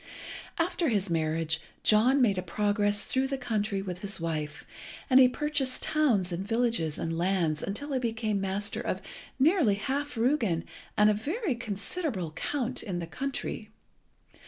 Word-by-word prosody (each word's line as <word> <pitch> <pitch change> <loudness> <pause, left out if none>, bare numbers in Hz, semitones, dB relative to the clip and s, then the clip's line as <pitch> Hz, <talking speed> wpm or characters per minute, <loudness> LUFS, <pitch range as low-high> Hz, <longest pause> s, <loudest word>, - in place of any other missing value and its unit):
After 335 -1 +1
his 200 -5 0
marriage 160 0 0 0.2
John 250 +6 +5
made 200 -5 +3
a - - -1
progress 205 +2 +1
through 260 +1 +1
the 275 0 -2
country 215 -6 -1
with 180 -2 -5
his 200 0 -4
wife; 155 -2 -3 0.5
and 255 - +8
he 255 - +9
purchased 275 -1 0
towns 235 - +2
and 175 +2 -2
villages 225 -8 0
and 165 0 -2
lands 170 -3 +1
until 280 +9 -3
he 260 - +1
became 225 -4 -1
master 195 +1 -1
of - - -2 0.4
nearly 280 - +4
half 275 +5 -2
Rügen 225 - +1 0.3
and 210 0 +6
a - - +3
very 315 - -1
considerable 220 - -3
Count 255 - -2
in 185 -4 -4
the 170 - -3
country. 270 +11 -4
210 Hz, 155 wpm, -29 LUFS, 185-265 Hz, 0.5 s, he